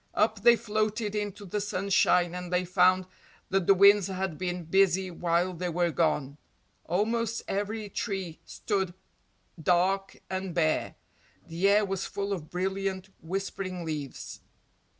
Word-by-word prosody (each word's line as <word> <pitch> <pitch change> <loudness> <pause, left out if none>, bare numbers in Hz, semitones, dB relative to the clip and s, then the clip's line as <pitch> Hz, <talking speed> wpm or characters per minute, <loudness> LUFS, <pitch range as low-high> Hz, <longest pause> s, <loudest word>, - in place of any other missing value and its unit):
Up 215 -1 +2
they 235 +2 +7
floated 215 -1 -1
into 205 -1 -4
the 205 +3 -2
sunshine 185 -3 +2
and 180 0 -6
they 180 0 +1
found 185 +1 +3 0.4
that 190 -2 +1
the 195 - +7
winds 200 0 +6
had 190 -3 -3
been 180 +1 -3
busy 190 +2 +2
while 175 +1 0
they 180 +1 -3
were 175 0 +1
gone. 150 -3 0 0.5
Almost 225 +5 0
every 205 +2 -2
tree 195 -5 -4
stood 190 -4 -2 0.7
dark 185 +4 +1
and 190 -2 -4
bare 155 -2 +1 0.5
the 175 +4 +1
air 205 +1 +4
was 195 -1 -3
full 200 0 -3
of 160 -5 -6
brilliant, 190 +1 -2
whispering 185 0 -4
leaves. 150 -4 -5
190 Hz, 135 wpm, -28 LUFS, 175-200 Hz, 0.7 s, they